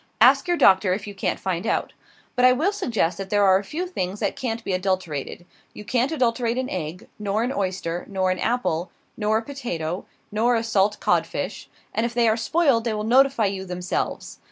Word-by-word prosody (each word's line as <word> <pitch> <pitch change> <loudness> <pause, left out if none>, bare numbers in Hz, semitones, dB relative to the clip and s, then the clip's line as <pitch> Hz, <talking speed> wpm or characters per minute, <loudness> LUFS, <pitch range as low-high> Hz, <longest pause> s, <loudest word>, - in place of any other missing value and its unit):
Ask 275 +7 +6
your 350 -1 +2
doctor, 190 - +5
if 200 +2 -4
you 205 - -7
can't 195 - -2
find 185 +2 -2
out. - - -1 0.4
But 250 - +1
I 255 0 +7
will 320 +10 +1
suggest 225 - -1
that 195 -1 -5
there 205 0 +3
are 190 -1 +5
a - - -7
few 320 - -4
things 200 - -3
that 205 - -1
can't 230 -2 -3
be 195 - -2
adulterated. 185 -4 -2 0.3
You 210 - -9
can't 255 +5 +1
adulterate 240 -4 0
an 260 0 -2
egg, 170 0 -5
nor 210 +1 0
an 250 +3 -1
oyster, 185 -4 -2
nor 190 -2 +1
an 185 - -2
apple, 205 -8 0 0.3
nor 215 0 +1
a 225 - -2
potato, 185 - -4 0.2
nor 230 +3 +2
a 225 - 0
salt 210 -2 +1
codfish; - - -1 0.2
and 225 - 0
if 235 0 -2
they 240 -1 +3
are 220 - +4
spoiled 260 0 +2
they 225 -2 -1
will 210 - -2
notify 260 0 +4
you 195 -1 -2
themselves! 180 -1 -4
215 Hz, 205 wpm, -24 LUFS, 190-245 Hz, 0.4 s, I